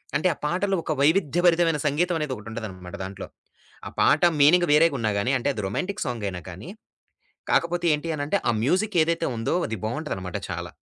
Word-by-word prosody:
అంటే 155 - +2
ఆ - - -18
పాటలో 190 +4 0
ఒక - - -3
వైవిధ్యభరితమైన 165 0 +3
సంగీతం 170 +5 +1
అనేదొకటుంటదన్నమాట 110 -9 -6
దాంట్లో. 95 +1 -7 0.6
ఆ - - -5
పాట - - +4 0.2
మీనింగ్ 175 +5 +5
వేరేగున్నా 140 -9 +3
గాని, 125 +7 0
అంటే 125 - -1
అది 105 - -5
రొమాంటిక్ 185 - -3
సాంగైనా 100 -7 -4
కానీ, 95 - -9 0.8
కాకపోతే 175 +1 +1
ఏంటి 150 +3 -3
అని 145 - -3
అంటే 200 - +2
ఆ - - +4
మ్యూజిక్ 185 - +1
ఏదైతే 165 +1 -1
ఉందో 115 - -1
అది 110 - -3
బావుంటదన్నమాట 110 - -4
చాలా. - - -5
150 Hz, 160 wpm, -25 LUFS, 110-175 Hz, 0.8 s, మీనింగ్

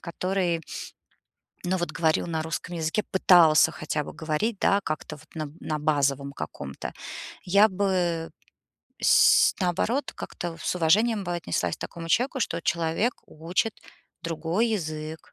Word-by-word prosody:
который, 180 -1 -1 1.0
ну, 185 +1 0
вот 175 -1 -2
говорил 160 0 +1
на 160 -2 -1
русском 165 +2 -4
языке, 165 +5 -1
пытался 175 -5 +6
хотя 150 -1 -3
бы - - -8
говорить, 160 +8 -1
да, 200 - +3
как-то 155 0 -4
вот 155 - -18
на 155 -2 -3
на 155 -1 -2
базовом 140 -2 +1
каком-то. 70 - -6 0.5
Я 200 +4 +6
бы, 180 -4 0 0.7
сь - - +6
наоборот, 215 +10 0
как-то 170 -1 -6
с - - -1
уважением 205 +5 +3
бы 175 0 -2
отнеслась 90 - -1
к - - -41
такому 165 -1 -7
человеку, 250 - +1
что 170 -5 -1
человек 170 +8 +1
учит 175 +7 -1 0.5
другой 170 +7 0
язык, 155 -6 -4
170 Hz, 135 wpm, -26 LUFS, 155-190 Hz, 1.0 s, пытался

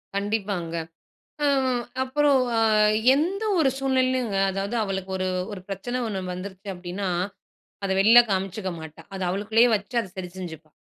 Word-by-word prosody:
கண்டிப்பாங்க. 200 -4 -2 0.7
அ - - +4 0.6
அப்பறம் 275 0 +3
அ - - +2 0.6
எந்த 365 +9 0 0.2
ஒரு 305 -4 +4
சூழ்நிலைலுங்க, 255 -5 +1
அதாவது 195 +4 -3
அவளுக்கு 195 -2 -3
ஒரு 185 0 -1 0.2
ஒரு 190 - -6
பிரச்சன 245 +6 -3
ஒண்ணு 195 -3 -3
வந்துருச்சு 190 +2 -8
அப்டின்னா, 180 +2 -4 0.8
அத 195 - -1
வெளியில 225 +5 +8
காமிச்சுக்க 190 +1 -2
மாட்டா. 160 -1 -10
அத 190 - -5
அவளுக்குள்ளேயே 220 +5 +3
வச்சு 205 +4 -6
அத 210 - -8
சரி 180 -1 -5
செஞ்சுப்பா. 160 -4 -8
200 Hz, 140 wpm, -25 LUFS, 185-245 Hz, 0.8 s, வெளியில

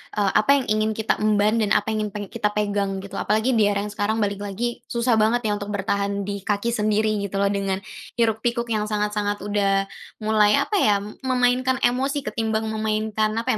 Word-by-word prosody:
eee, 205 -2 +2
apa 215 - -2
yang 270 - 0
ingin 215 0 +1
kita 220 0 0
emban 215 +1 +2
dan 210 -2 +1
apa 205 - +1
yang 215 -1 -1
pengen 205 -1 -6
kita 210 - 0
pegang, 200 -2 -1
gitu. 200 - -8
Apalagi 220 +5 +1
di 215 - +4
era 200 -1 0
yang 210 - -4
sekarang 210 +2 -1
balik 200 -1 -2
lagi, 205 +4 -3
susah 235 -1 +1
banget 225 +3 +3
ya - - +1
untuk 205 - -6
bertahan 200 0 -1
di 200 0 -4
kaki 205 +2 0
sendiri 215 -1 +1 0.2
gitu 195 - -8
loh, 200 - +3
dengan 195 -1 -1 0.3
hiruk-pikuk 235 +1 0
yang 215 -1 0
sangat-sangat 210 -1 -1
udah, 200 -1 +1 0.4
mulai 215 -1 +4
apa 425 - -3
ya, 210 - +4 0.3
memainkan 255 0 +2
emosi, 270 +3 +1
ketimbang 220 -3 -1
memainkan, 215 0 -1
apa 230 +3 0
215 Hz, 190 wpm, -23 LUFS, 205-225 Hz, 0.4 s, di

